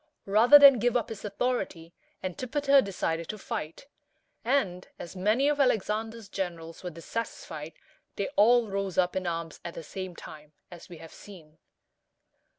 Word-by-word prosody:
Rather 225 Hz, +8 st, +7 dB
than 280 Hz, -4 st, +8 dB
give 245 Hz, +2 st, +2 dB
up 240 Hz, -, -3 dB
his 220 Hz, -3 st, -8 dB
authority, 200 Hz, -6 st, -3 dB, 0.3 s
Antipater 275 Hz, -, +2 dB
decided 170 Hz, -5 st, -3 dB
to 215 Hz, -, -4 dB
fight; 210 Hz, -, -6 dB, 0.6 s
and, 210 Hz, -8 st, 0 dB
as 175 Hz, -, -9 dB
many 215 Hz, +9 st, +2 dB
of 295 Hz, 0 st, +1 dB
Alexander's 225 Hz, -3 st, 0 dB
generals 170 Hz, -4 st, -5 dB
were 180 Hz, -, -4 dB
dissatisfied, 165 Hz, -3 st, -6 dB, 0.4 s
they 200 Hz, -, -2 dB
all 240 Hz, -1 st, +4 dB
rose 195 Hz, -2 st, -3 dB
up 180 Hz, -1 st, +2 dB
in 185 Hz, -1 st, -2 dB
arms 165 Hz, -2 st, -4 dB
at 170 Hz, -, -7 dB
the 165 Hz, -, -7 dB
same 185 Hz, +2 st, -7 dB
time, 150 Hz, -2 st, -12 dB, 0.2 s
as 175 Hz, +1 st, -12 dB
we 175 Hz, -, -10 dB
have 165 Hz, 0 st, -12 dB
seen. 160 Hz, -6 st, -14 dB
195 Hz, 155 wpm, -28 LUFS, 170-235 Hz, 0.6 s, than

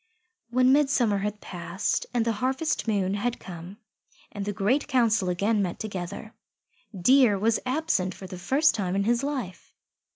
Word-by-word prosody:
When 255 Hz, +1 st, +4 dB
midsummer 265 Hz, -8 st, +2 dB
had 210 Hz, +1 st, -3 dB
passed 180 Hz, +3 st, -3 dB
and 240 Hz, -2 st, 0 dB
the 230 Hz, -, +1 dB
harvest 265 Hz, +2 st, -1 dB
moon 195 Hz, -3 st, +1 dB
had 230 Hz, +4 st, -2 dB
come 175 Hz, +2 st, -9 dB, 0.5 s
and 205 Hz, -, -5 dB
the 205 Hz, -, -1 dB
Great 210 Hz, +9 st, 0 dB
Council 225 Hz, -7 st, +2 dB
again 205 Hz, +4 st, +1 dB
met 180 Hz, -3 st, -2 dB
together, 200 Hz, +1 st, -6 dB, 0.7 s
Deer 245 Hz, +1 st, +5 dB
was 220 Hz, +3 st, +1 dB
absent 255 Hz, -, 0 dB
for 190 Hz, -, -10 dB
the 185 Hz, -1 st, -8 dB
first 290 Hz, +10 st, +3 dB
time 190 Hz, -4 st, -2 dB
in 200 Hz, -, +1 dB
his 235 Hz, +3 st, +1 dB
life. 265 Hz, -11 st, -5 dB
215 Hz, 160 wpm, -26 LUFS, 190-255 Hz, 0.7 s, Deer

